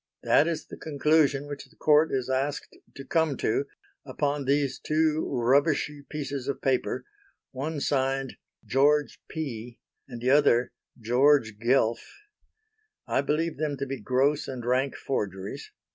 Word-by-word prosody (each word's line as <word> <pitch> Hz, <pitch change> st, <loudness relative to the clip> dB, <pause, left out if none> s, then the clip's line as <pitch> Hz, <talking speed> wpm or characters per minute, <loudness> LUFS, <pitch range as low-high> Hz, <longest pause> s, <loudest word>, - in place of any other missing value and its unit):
That 150 Hz, -, +4 dB
is 165 Hz, -2 st, -2 dB
the -, -, -10 dB
conclusion 145 Hz, -1 st, +2 dB
which 145 Hz, -1 st, -7 dB
the -, -, -24 dB
Court 155 Hz, +1 st, +4 dB
is 130 Hz, -2 st, -1 dB
asked 135 Hz, +2 st, -2 dB, 0.2 s
to 135 Hz, -, -9 dB
come 160 Hz, -3 st, +1 dB
to 135 Hz, +6 st, 0 dB, 0.4 s
upon 145 Hz, +1 st, -2 dB
these 140 Hz, 0 st, +1 dB
two 155 Hz, 0 st, +1 dB
rubbishy 145 Hz, +4 st, +1 dB
pieces 140 Hz, -3 st, -4 dB
of 140 Hz, -, -2 dB
paper, 130 Hz, -2 st, -1 dB, 0.5 s
one 145 Hz, +3 st, -4 dB
signed 135 Hz, -1 st, -1 dB, 0.3 s
'George 145 Hz, +2 st, +2 dB
P.,' 120 Hz, -6 st, -6 dB, 0.3 s
and 120 Hz, -3 st, -8 dB
the 125 Hz, +2 st, +1 dB
other 125 Hz, -4 st, +4 dB, 0.3 s
'George 120 Hz, -1 st, +3 dB
Guelph.' 120 Hz, -, +1 dB, 0.9 s
I -, -, +1 dB
believe 155 Hz, +3 st, -1 dB
them 145 Hz, -1 st, -2 dB
to 140 Hz, -, -3 dB
be 135 Hz, -1 st, -5 dB
gross 135 Hz, +6 st, +1 dB
and 125 Hz, -3 st, -6 dB
rank 130 Hz, +2 st, +1 dB
forgeries. 100 Hz, -, -4 dB
140 Hz, 140 wpm, -27 LUFS, 130-150 Hz, 0.9 s, That